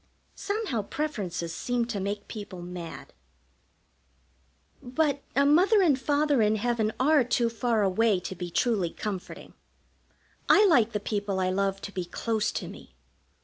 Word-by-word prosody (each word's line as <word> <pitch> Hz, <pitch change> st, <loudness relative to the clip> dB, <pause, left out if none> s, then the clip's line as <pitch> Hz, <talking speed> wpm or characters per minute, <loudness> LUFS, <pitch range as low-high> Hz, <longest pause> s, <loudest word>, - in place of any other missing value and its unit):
Somehow 405 Hz, -, -2 dB
preferences 200 Hz, -, -4 dB
seem 245 Hz, +6 st, -1 dB
to 230 Hz, -4 st, -4 dB
make 200 Hz, +1 st, -4 dB
people 200 Hz, -5 st, -8 dB
mad. 175 Hz, -2 st, -8 dB, 1.7 s
But 285 Hz, +3 st, 0 dB
a 280 Hz, +1 st, +4 dB
Mother 375 Hz, +8 st, +5 dB
and 290 Hz, -7 st, +3 dB
Father 290 Hz, -3 st, +2 dB
in 215 Hz, 0 st, +3 dB
heaven 220 Hz, 0 st, 0 dB
are 290 Hz, +1 st, +4 dB
too 235 Hz, -1 st, +1 dB
far 230 Hz, -2 st, 0 dB
away 200 Hz, +1 st, +2 dB
to 185 Hz, -, -5 dB
be 180 Hz, -1 st, -6 dB
truly 200 Hz, -2 st, +1 dB
comforting. 195 Hz, 0 st, -6 dB, 1.0 s
I 420 Hz, -, +7 dB
like 240 Hz, -, +4 dB
the 210 Hz, -, 0 dB
people 205 Hz, -2 st, -2 dB
I 185 Hz, 0 st, +1 dB
love 195 Hz, 0 st, -1 dB
to 200 Hz, -, -6 dB
be 185 Hz, -3 st, -4 dB
close 220 Hz, +4 st, -1 dB
to -, -, -4 dB
me. -, -, -12 dB
220 Hz, 145 wpm, -27 LUFS, 195-270 Hz, 1.7 s, I